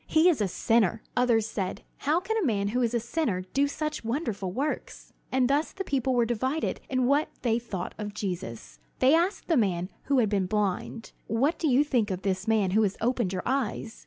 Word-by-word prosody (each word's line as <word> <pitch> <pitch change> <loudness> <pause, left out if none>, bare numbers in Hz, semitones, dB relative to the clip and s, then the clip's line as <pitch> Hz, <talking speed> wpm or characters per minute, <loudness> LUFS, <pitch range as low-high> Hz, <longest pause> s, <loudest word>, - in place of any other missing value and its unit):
He 320 +2 +4
is 305 -10 +1
a 205 - +2
sinner!" 225 +2 +1
Others 240 -3 +3
said, 195 -4 -4
"How 305 +4 +1
can 415 +5 -3
a 445 - +1
man 200 -8 +1
who 250 +4 0
is 240 0 +1
a - - +3
sinner 235 - -1
do 280 +1 +3
such 305 0 -3
wonderful 225 - -2
works?" 280 +10 -4 0.2
And 260 -1 +3
thus 285 +4 +1
the 385 - -4
people 265 -5 0
were 240 -1 +3
divided 260 +7 -1
in 255 -1 +1
what 285 +4 +2
they 230 -1 +2
thought 230 -6 -5
of 210 -1 -5
Jesus. 115 - -5 0.2
They 260 +3 +5
asked 345 +5 +1
the 330 - +3
man 185 -5 +1 0.2
who 280 0 +2
had 235 -4 +4
been 200 -3 0
blind: 210 +3 -2 0.2
"What 270 +9 +1
do 325 - +1
you 270 +1 +5
think 245 -8 +1
of 185 -1 -3
this 190 0 -1
man 215 -4 +2
who 215 +3 +4
has 200 -2 0
opened 235 -4 0
your 185 - -3
eyes?" 240 -3 -2
235 Hz, 215 wpm, -27 LUFS, 205-275 Hz, 0.2 s, They